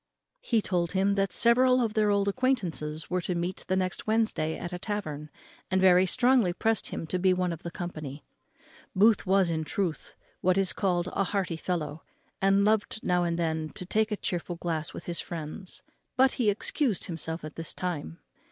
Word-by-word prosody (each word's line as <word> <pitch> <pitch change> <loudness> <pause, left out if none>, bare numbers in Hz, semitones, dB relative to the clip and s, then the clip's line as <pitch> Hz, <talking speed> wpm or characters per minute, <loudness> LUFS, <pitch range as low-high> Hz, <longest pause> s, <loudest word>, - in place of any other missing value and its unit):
He 225 -3 +1
told 175 -2 -1
him 195 +1 +2
that 195 -1 0
several 255 +4 +4
of 225 -3 0
their 215 -1 +2
old 200 -1 +2
acquaintance 185 - -1
were 180 0 -1
to 180 +1 -2
meet 175 +2 -3
the 185 - +1
next 185 +1 -2
Wednesday 215 -8 +1
at 175 0 -6
a 180 - -4
tavern, 155 -8 -4 0.4
and 190 - +2
very 185 0 +5
strongly 245 -4 +3
pressed 225 +2 0
him - - -5
to 180 +3 -2
be 185 0 +3
one 180 -1 0
of 165 - -9
the 170 - -5
company. 155 -5 -6 0.7
Booth 210 +1 +4
was, 190 -2 +3
in 160 -1 -1
truth, 170 0 -3 0.2
what 185 +1 +2
is 195 -2 +2
called 180 -3 0
a 195 - +1
hearty 190 -3 -1
fellow, 160 -3 -3 0.4
and 195 +1 +4
loved 215 0 +1
now 180 -1 +2
and 170 -1 -1
then 160 -2 -1
to 180 - -4
take 220 +4 +1
a 210 - -1
chearful 175 -3 -3
glass 165 -2 -3
with - - -8
his 170 -1 -4
friends; 170 +3 -7 0.3
but 265 +1 +5
he 235 -5 +1
excused 215 - 0
himself 165 -1 -4
at 155 - -8
this 165 -1 -5
time. 150 - -4
185 Hz, 190 wpm, -28 LUFS, 170-205 Hz, 0.7 s, very